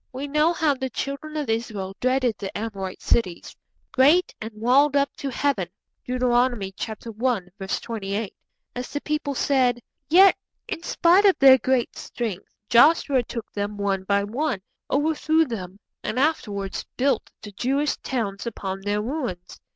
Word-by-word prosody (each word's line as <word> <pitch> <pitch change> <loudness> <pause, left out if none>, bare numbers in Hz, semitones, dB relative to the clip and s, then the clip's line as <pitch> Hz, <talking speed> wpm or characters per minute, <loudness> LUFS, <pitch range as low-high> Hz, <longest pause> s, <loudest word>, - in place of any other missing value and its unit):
We 270 +3 -5
know 300 +3 +3
how 320 -4 +2
the 265 -1 -4
Children 280 +5 -5
of 295 -3 -2
Israel 215 -4 -3
dreaded 255 -2 +1
the 195 -1 -5
Amorite 200 -4 -5
cities. 185 -7 0 0.4
'Great 300 +8 +4
and 220 +1 -5
walled 265 +6 +3
up 280 0 +1
to 275 - -4
Heaven' 250 -8 0 0.4
(Deuteronomy 245 -5 +1
i. 220 - -4
28), 210 -2 -3 0.4
as 250 0 -5
the 290 - -4
people 300 -2 -2
said. 255 -3 +2 0.3
Yet, 380 +4 +7 0.3
in 325 - -4
spite 350 +3 +4
of 390 - +5
their 265 -1 +8
great 255 +1 0
strength, 215 -6 -5 0.2
Joshua 275 +1 +5
took 230 -1 -7
them 205 0 -3
one 195 -2 -1
by 200 +1 +1
one, 225 -1 -2 0.3
overthrew 315 +2 +2
them, 195 - -6 0.3
and 215 - -3
afterwards 210 -10 -1
built 260 -2 +1
the 205 - -8
Jewish 275 +8 0
towns 215 -5 -3
upon 195 -4 -4
their 205 +1 -1
ruins. 240 - -5
245 Hz, 145 wpm, -24 LUFS, 205-280 Hz, 0.4 s, their